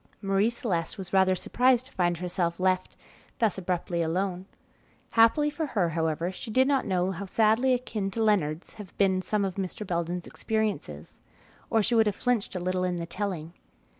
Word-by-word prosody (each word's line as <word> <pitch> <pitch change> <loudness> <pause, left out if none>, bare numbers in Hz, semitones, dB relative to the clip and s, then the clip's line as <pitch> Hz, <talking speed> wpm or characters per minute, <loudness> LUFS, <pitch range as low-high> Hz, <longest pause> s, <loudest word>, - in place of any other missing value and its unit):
Marie 195 +2 +2
Celeste 200 -9 -2
was 190 -2 -8
rather 190 -1 +4
surprised 250 +6 +2
to - - -12
find 175 -2 0
herself 175 -1 -2
left 185 0 0 0.4
thus 220 -6 +1
abruptly 175 -1 -2
alone. 180 +3 -1 0.6
Happily 240 +7 +4
for 310 +1 -3
her, 190 -10 +1
however, 165 +1 -1
she 190 - -8
did 260 +4 +3
not 275 -4 +1
know 185 -1 +1
how 190 +2 -6
sadly 225 +6 +3
akin 215 -5 -3
to 225 +3 -1
Leonard's 175 -7 0
had 195 - -13
been 190 -2 +3
some 205 +1 0
of 190 -1 -4
Mr. 195 +2 -4
Belden's 175 -1 -2
experiences, 200 - -3 0.5
or 225 -1 +3
she 225 - 0
would 225 -2 +4
have 205 - 0
flinched 240 -5 -1
a - - -1
little 185 +1 -1
in 180 -1 0
the 170 -1 -3
telling. 170 -3 -4
190 Hz, 180 wpm, -27 LUFS, 175-220 Hz, 0.6 s, rather